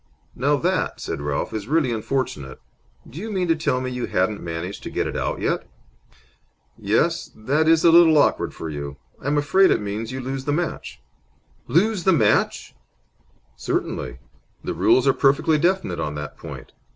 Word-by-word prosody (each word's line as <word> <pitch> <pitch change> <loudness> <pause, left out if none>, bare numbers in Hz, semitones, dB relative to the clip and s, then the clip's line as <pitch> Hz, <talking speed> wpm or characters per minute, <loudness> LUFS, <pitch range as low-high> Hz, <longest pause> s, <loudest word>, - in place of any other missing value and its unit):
"Now 140 +4 +2
that," 180 +4 -1
said - - -4
Ralph, 75 +7 -2
"is 110 -1 -4
really 150 -3 +2
unfortunate! 110 - -3 0.5
Do 145 - -9
you 220 +3 -5
mean 185 -3 -1
to 165 - +4
tell 155 -5 0
me 130 0 -4
you 125 -1 -3
hadn't 100 +3 0
managed 85 +3 -5
to - - -6
get - - -1
it - - -4
out - - -2
yet? - - -1 1.1
Yes, - - 0
that 140 +8 0
is 165 0 +4
a 170 - +8
little 165 -2 +7
awkward 145 - +2
for 80 - -7
you. 70 -2 -6 0.2
I'm 145 +2 0
afraid 185 +6 +4
it - - +3
means 105 +2 -4
that 130 - -5
you - - -4
lose 135 +1 -4
the 145 - 0
match." 145 - -4 0.6
"Lose 190 - +2
the 190 - +4
match?" 165 - +1 0.8
"Certainly. 65 -1 -3 0.5
The - - -3
rules 130 +1 +3
are 135 - +5
perfectly 140 +3 +3
definite 175 - 0
on 75 - -3
that 75 0 -6
point. - - -10
135 Hz, 175 wpm, -23 LUFS, 100-160 Hz, 1.1 s, a